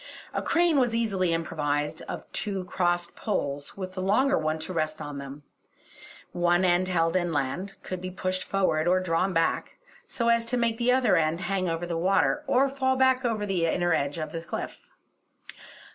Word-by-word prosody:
A -, -, -1 dB
crane 335 Hz, -3 st, +3 dB
was 240 Hz, -3 st, +2 dB
easily 195 Hz, -6 st, +1 dB
improvised 150 Hz, -2 st, -1 dB
of -, -, -5 dB
two 195 Hz, -3 st, -2 dB
crossed 175 Hz, -1 st, -1 dB
poles, 145 Hz, -9 st, -3 dB
with 185 Hz, -1 st, -6 dB
a 185 Hz, -, -3 dB
longer 235 Hz, +9 st, +3 dB
one 155 Hz, 0 st, 0 dB
to 170 Hz, +3 st, -5 dB
rest 155 Hz, -2 st, -1 dB
on 145 Hz, -2 st, -6 dB
them; 140 Hz, +1 st, -9 dB, 0.9 s
one 175 Hz, +1 st, +2 dB
end 180 Hz, +1 st, +3 dB
held 165 Hz, -2 st, +1 dB
inland, 175 Hz, +2 st, -1 dB
could 185 Hz, -1 st, -5 dB
be 185 Hz, -, -4 dB
pushed 185 Hz, 0 st, -2 dB
forward 175 Hz, -5 st, +1 dB
or 185 Hz, +1 st, +4 dB
drawn 185 Hz, +1 st, 0 dB
back, 165 Hz, -2 st, 0 dB, 0.3 s
so 235 Hz, -1 st, -1 dB
as 230 Hz, 0 st, +4 dB
to 250 Hz, +1 st, 0 dB
make 230 Hz, -1 st, 0 dB
the 245 Hz, +1 st, +3 dB
other 250 Hz, -7 st, +4 dB
end 160 Hz, +2 st, +1 dB
hang 190 Hz, -2 st, -1 dB
over 165 Hz, +1 st, -2 dB
the 170 Hz, -1 st, -2 dB
water 195 Hz, -, +2 dB
or 270 Hz, +1 st, +4 dB
fall 265 Hz, -1 st, 0 dB
back 260 Hz, 0 st, +3 dB
over 220 Hz, -4 st, 0 dB
the 180 Hz, -4 st, 0 dB
inner 175 Hz, +1 st, +1 dB
edge 140 Hz, +1 st, 0 dB
of 155 Hz, -1 st, -4 dB
the 165 Hz, -, -4 dB
cliff. 170 Hz, -, -6 dB
185 Hz, 185 wpm, -27 LUFS, 165-215 Hz, 0.9 s, or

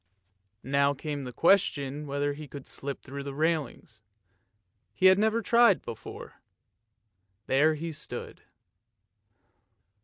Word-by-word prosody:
Now 140 Hz, +1 st, +2 dB
came 145 Hz, +1 st, -4 dB
the 125 Hz, -2 st, -6 dB
question 145 Hz, -2 st, +2 dB
whether 145 Hz, +1 st, -1 dB
he 150 Hz, +1 st, -9 dB
could 140 Hz, -1 st, -10 dB
slip 140 Hz, 0 st, -6 dB
through 140 Hz, +2 st, -7 dB
the 140 Hz, 0 st, -6 dB
railings; 150 Hz, -8 st, -2 dB, 0.9 s
he 190 Hz, -, 0 dB
had 185 Hz, +1 st, +7 dB
never 220 Hz, +2 st, +1 dB
tried 235 Hz, -4 st, +5 dB
it -, -, -26 dB
before. 115 Hz, -2 st, -9 dB, 1.0 s
There 150 Hz, +4 st, +3 dB
he 165 Hz, +2 st, -5 dB
stood. 150 Hz, -, -7 dB
145 Hz, 120 wpm, -28 LUFS, 140-165 Hz, 1.0 s, had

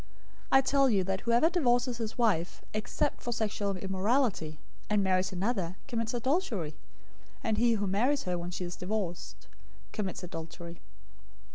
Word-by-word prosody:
019:009 -, -, +8 dB
I -, -, +6 dB
tell 275 Hz, 0 st, +4 dB
you 200 Hz, -5 st, +3 dB
that 190 Hz, +1 st, -1 dB
whoever 235 Hz, +7 st, +4 dB
divorces 245 Hz, -7 st, +2 dB
his 225 Hz, +1 st, -4 dB
wife, 200 Hz, -8 st, +1 dB
except 215 Hz, 0 st, -1 dB
for 240 Hz, -, -3 dB
sexual 210 Hz, -3 st, -1 dB
immorality, 190 Hz, -, +1 dB, 0.3 s
and 210 Hz, -1 st, +3 dB
marries 185 Hz, 0 st, +2 dB
another, 190 Hz, -2 st, -1 dB
commits 230 Hz, -2 st, -1 dB
adultery; 240 Hz, -, 0 dB, 0.7 s
and 220 Hz, -1 st, +1 dB
he 235 Hz, 0 st, +5 dB
who 205 Hz, -2 st, 0 dB
marries 245 Hz, +9 st, +2 dB
her 180 Hz, -1 st, -1 dB
when 175 Hz, 0 st, -4 dB
she 180 Hz, 0 st, -4 dB
is 175 Hz, -, -5 dB
divorced 185 Hz, -2 st, -4 dB, 0.4 s
commits 195 Hz, -3 st, -3 dB
adultery." 170 Hz, 0 st, -7 dB
210 Hz, 150 wpm, -31 LUFS, 185-240 Hz, 0.7 s, 019:009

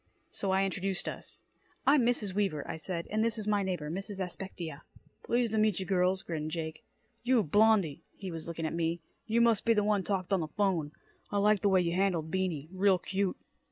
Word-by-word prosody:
So 195 Hz, -, -3 dB
I 190 Hz, +1 st, +3 dB
introduced 190 Hz, 0 st, -2 dB
us. -, -, -7 dB, 0.4 s
"I'm 280 Hz, -2 st, +5 dB
Mrs. 215 Hz, -6 st, 0 dB
Weaver," 190 Hz, -8 st, -1 dB
I 165 Hz, -, -4 dB
said. 170 Hz, +1 st, -4 dB
"And 215 Hz, +1 st, +2 dB
this 230 Hz, 0 st, 0 dB
is 215 Hz, -, -4 dB
my 210 Hz, -1 st, +2 dB
neighbor, 180 Hz, -6 st, -2 dB
Mrs. 195 Hz, +3 st, -5 dB
Aspectia." 175 Hz, -4 st, -5 dB, 0.4 s
"Pleased 240 Hz, -1 st, +1 dB
ta 220 Hz, -, +1 dB
meetcha, 210 Hz, -3 st, +2 dB
girls," 185 Hz, 0 st, +1 dB
grinned 155 Hz, -2 st, -3 dB
Jake. 160 Hz, -1 st, -5 dB, 0.4 s
"You, 245 Hz, -2 st, +3 dB
Blondie," 205 Hz, -3 st, +3 dB
he 190 Hz, -2 st, -6 dB
was 165 Hz, -1 st, -6 dB
looking 165 Hz, -1 st, -4 dB
at 160 Hz, -, -2 dB
me, 165 Hz, 0 st, 0 dB, 0.3 s
"you 230 Hz, +1 st, +3 dB
must 230 Hz, -3 st, +4 dB
be 230 Hz, -1 st, +4 dB
the 210 Hz, -, +3 dB
one 205 Hz, -1 st, +2 dB
talked 195 Hz, -1 st, -1 dB
on 190 Hz, -, +3 dB
the 160 Hz, -, -2 dB
'phone. 170 Hz, -4 st, 0 dB, 0.4 s
I 205 Hz, -, -1 dB
liked 205 Hz, -1 st, +4 dB
the 200 Hz, -, +3 dB
way 190 Hz, -1 st, +4 dB
you 170 Hz, -1 st, 0 dB
handled 180 Hz, -5 st, +1 dB
Beany. 175 Hz, -6 st, -1 dB
Real 190 Hz, 0 st, +3 dB
cute." 190 Hz, +2 st, -1 dB
190 Hz, 205 wpm, -31 LUFS, 170-210 Hz, 0.4 s, I'm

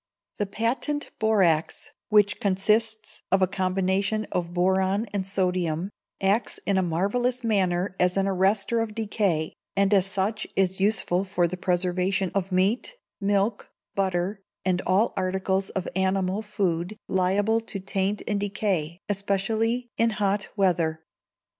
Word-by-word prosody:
The 205 Hz, -, -1 dB
Patent 245 Hz, +8 st, -1 dB
Borax, 190 Hz, -8 st, +2 dB, 0.2 s
which 210 Hz, -1 st, +4 dB
consists 215 Hz, +3 st, 0 dB
of 195 Hz, -1 st, +4 dB
a -, -, +4 dB
combination 190 Hz, +3 st, 0 dB
of 175 Hz, -1 st, -2 dB
boron 190 Hz, +4 st, +1 dB
and 195 Hz, -2 st, -2 dB
sodium, 180 Hz, -2 st, 0 dB, 0.3 s
acts 200 Hz, +4 st, +1 dB
in 195 Hz, -1 st, +2 dB
a -, -, +3 dB
marvellous 210 Hz, +9 st, 0 dB
manner 190 Hz, -4 st, +1 dB
as 180 Hz, +1 st, +2 dB
an 195 Hz, -, +2 dB
arrester 195 Hz, +4 st, +2 dB
of 220 Hz, -2 st, -3 dB
decay, 200 Hz, -8 st, 0 dB, 0.2 s
and 200 Hz, +1 st, +3 dB
as 195 Hz, -1 st, +4 dB
such 195 Hz, +3 st, -1 dB
is 190 Hz, 0 st, +2 dB
useful 195 Hz, -2 st, +2 dB
for 185 Hz, -3 st, +1 dB
the 180 Hz, -, -4 dB
preservation 180 Hz, +1 st, 0 dB
of 195 Hz, -1 st, -1 dB
meat, 200 Hz, -, +1 dB, 0.2 s
milk, 200 Hz, +1 st, 0 dB, 0.2 s
butter, 190 Hz, +1 st, -1 dB, 0.2 s
and 185 Hz, -1 st, +1 dB
all 195 Hz, +6 st, +3 dB
articles 190 Hz, +1 st, 0 dB
of 190 Hz, -1 st, -3 dB
animal 190 Hz, +1 st, +1 dB
food 200 Hz, -2 st, -2 dB
liable 200 Hz, +4 st, +2 dB
to 215 Hz, -3 st, -6 dB
taint 195 Hz, +1 st, -1 dB
and 205 Hz, -1 st, 0 dB
decay, 195 Hz, -5 st, -1 dB
especially 220 Hz, +4 st, 0 dB
in 230 Hz, 0 st, +4 dB
hot 200 Hz, 0 st, 0 dB
weather. 170 Hz, -5 st, +1 dB
195 Hz, 135 wpm, -26 LUFS, 185-210 Hz, 0.3 s, which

